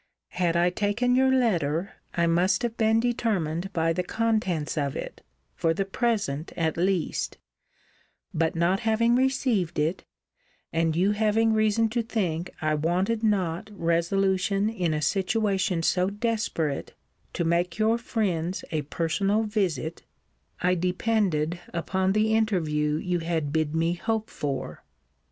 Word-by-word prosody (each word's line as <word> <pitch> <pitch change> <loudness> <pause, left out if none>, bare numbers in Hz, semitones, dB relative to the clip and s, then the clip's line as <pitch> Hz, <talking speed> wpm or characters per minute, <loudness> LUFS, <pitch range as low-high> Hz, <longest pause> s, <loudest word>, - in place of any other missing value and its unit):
Had 175 -1 0
I 175 +1 +3
taken 210 +6 +1
your 265 +1 +4
letter 185 - +1 0.2
I 170 - +2
must 175 +4 +2
have 235 -1 -1
been 220 0 +3
determined 195 -7 -1
by 165 -2 +1
the 180 - 0
contents 190 -7 -1
of 140 -3 -1
it, - - -6 0.3
for 165 -1 0
the 195 - -1
present 195 - -1
at 160 -2 0
least: 180 0 -1 1.0
but 160 +1 0
not 170 +3 +2
having 230 +1 +2
received 255 -8 +1
it, 155 +5 0 0.7
and 165 -1 +1
you 190 +4 +3
having 220 +1 +2
reason 215 +1 +3
to 235 +2 0
think 185 -7 -2
I 155 0 +2
wanted 180 +9 0
not 195 -3 0
resolution 195 +3 +1
in 180 -7 -1
a 150 - -2
situation 195 -1 +1
so 180 +2 +2
desperate, 205 - -2 0.4
to - - -1
make 170 +2 0
your 220 +2 +2
friends 190 -7 -2
a 155 -2 0
personal 195 +8 0
visit, 180 - -2 0.6
I 180 +1 +3
depended 180 -2 0 0.2
upon 190 +3 0
the 215 +1 +2
interview 160 -9 +1
you 175 +2 -1
had 160 -3 -2
bid 155 -1 0
me 165 +1 +1
hope 220 +4 -2
for.' 140 -2 -4
185 Hz, 135 wpm, -26 LUFS, 165-220 Hz, 1.0 s, your